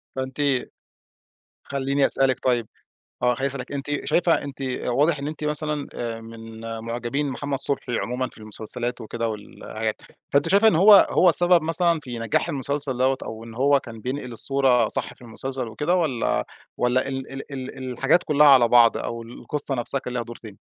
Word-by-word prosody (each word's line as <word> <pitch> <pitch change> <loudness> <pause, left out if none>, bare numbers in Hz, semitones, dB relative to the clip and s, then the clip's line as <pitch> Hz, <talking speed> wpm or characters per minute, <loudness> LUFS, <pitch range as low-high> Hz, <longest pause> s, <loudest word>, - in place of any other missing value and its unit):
فأنتِ 130 0 -5 1.3
خلّيني 140 0 0
أسألِك 135 -1 +2
طيب 120 -4 +1 0.6
آه. 125 0 +4
خلّيني 135 +3 -1
أسألِك، 130 0 -6
أنتِ 145 +1 -3
شايفة 175 -1 +2
أنتِ 140 -1 -8 0.2
واضح 145 +5 +2
إن 140 - -4
أنتِ 155 0 -6
مثلًا، 150 -1 -2
آآ، 115 -1 -4
من 115 0 -11 0.2
معجبين 120 +5 -3
محمد 140 +2 -3
صُبحي 135 -3 -1
عمومًا 125 +5 -2
في - - -20
المسلسلات 110 +3 -5
وكده 115 +1 -3
والحاجات. 110 +1 -5 0.4
فأنتِ 140 +3 +3
شايفة 200 +4 +5
إن 195 - +4
هو 200 +4 +8
هو 180 - +5
السبب 175 +2 +4
مثلًا 165 +1 +1
في 120 -3 -6
نجاح 115 -1 0
المسلسل 140 -1 -2
دوّة 130 +1 +2
أو 110 0 -7
إن 115 0 -10
هو 140 +3 +3
كان 115 -2 -10
بينقل 130 0 -4
الصورة 125 -1 +2
صح - - -1
في - - -24
المسلسل 130 +1 -4
وكده؟ 150 +11 0
والّا 115 - 0 0.3
والّا 125 +1 +1
ال 135 -1 -5
ال 135 +1 -8
ال 130 -1 -6
الحاجات 135 +8 +2
كُلّها 150 -1 +4
على 130 -4 +7
بعض 115 -1 +6
أو 115 0 -4
القصة 135 +4 -4
نفسها 125 +3 0
كان 125 - -7
ليها 120 -1 -1
دور 120 0 -9
تاني؟ 110 -4 -12
130 Hz, 175 wpm, -24 LUFS, 120-145 Hz, 1.3 s, هو